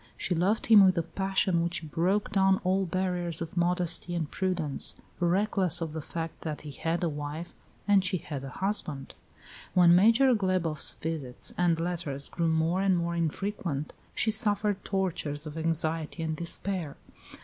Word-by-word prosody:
She 180 - -1
loved 185 +6 +1
him 215 -4 +8
with 185 -2 +4
a 170 - +2
passion 190 -1 0
which 170 -2 -2
broke 185 +6 +1
down 190 -1 +3
all 190 +1 +1
barriers 180 -2 -1
of 165 0 -6
modesty 175 0 -1
and 160 -3 -2
prudence, 180 -7 -2 0.2
reckless 185 0 +1
of 165 -2 -4
the 160 - -4
fact 165 +2 -6
that 155 -2 -4
he 150 - -8
had 165 +5 -2
a - - +2
wife, 150 +2 -5 0.3
as 200 -2 +5
she 185 0 0
had 145 -5 -6
a 135 - -6
husband. 155 -6 0 0.6
When 175 -1 +7
Major 230 +7 +5
Glebof's 185 -7 +1
visits 150 -6 -4
and 175 -2 +2
letters 165 -5 -3
grew 170 -1 -1
more 160 +3 +1
and 195 -2 +3
more 170 0 -1
infrequent, 170 -3 -2 0.2
she 220 - +1
suffered 210 -2 +1
tortures 165 -6 -1
of 155 0 -7
anxiety 165 0 -1
and 160 -1 -2
despair. 170 -1 -3
175 Hz, 160 wpm, -29 LUFS, 160-190 Hz, 0.6 s, him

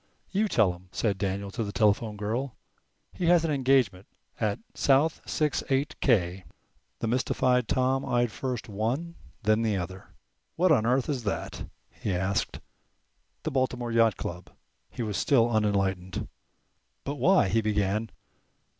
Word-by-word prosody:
"You 210 +3 +2
tell 110 - +3
him," 90 +1 -15
said 100 +1 -1
Daniel 100 0 -2
to 115 +2 -2
the 100 - -4
telephone 105 0 +1
girl. 115 +6 -2 0.6
"He 175 - -2
has 170 -1 +5
an 160 - 0
engagement 130 -9 +2 0.3
at 105 -2 0 0.2
South 145 +4 +2
six 150 -2 0
eight 140 +3 +1
k." 95 -7 +2 0.6
The - - 0
mystified 125 0 +1
Tom 130 +1 +1
eyed 120 -1 +1
first 125 0 -4
one, 120 +11 -2 0.3
then 110 +1 +3
the 110 -3 +1
other. 95 +1 -6 0.5
"What 180 +1 +3
on 115 -7 +4
earth 125 +1 +2
is 135 -5 -2
that?" 100 - -3 0.2
he 100 - -3
asked. 95 +2 -1 0.8
"The - - -2
Baltimore 125 -2 -1
Yacht 115 -4 +3
Club." 90 +1 -6 0.4
He 120 - -5
was 105 -3 -2
still 120 -4 +3
unenlightened. 95 -4 0 0.8
"But 140 +1 -4
why" 175 - +4
he 115 +3 +2
began. 105 +1 0
115 Hz, 145 wpm, -28 LUFS, 100-135 Hz, 0.8 s, has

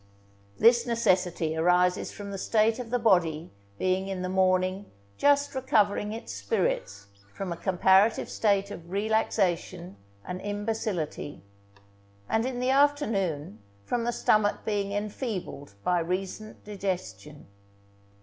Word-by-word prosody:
This 235 +2 +5
necessity 180 -8 +1
arises 180 +2 +2
from 200 -1 -8
the 195 - -5
state 220 +3 +2
of 245 -2 -6
the 245 - +1
body 175 -8 +2 0.3
being 185 - 0
in 190 -2 -4
the 185 - -2
morning 185 +1 +1 0.3
just 285 - +3
recovering 210 -6 +1
its 220 - -6
spirits 100 0 -2 0.3
from 195 -2 -4
a - - -6
comparative 190 +4 +3
state 200 -2 +1
of 170 -4 -9
relaxation 190 - -1 0.3
and 180 0 -5
imbecility, 205 - -3 0.8
and 225 +3 +1
in 255 -2 -4
the 250 +1 +1
afternoon 205 - +1 0.3
from 235 - -1
the 240 - 0
stomach 215 -3 +1
being 205 -2 -1
enfeebled 205 - -4
by 180 -1 +2
recent 190 +5 -4
digestion. 185 - -5
195 Hz, 120 wpm, -27 LUFS, 180-220 Hz, 0.8 s, This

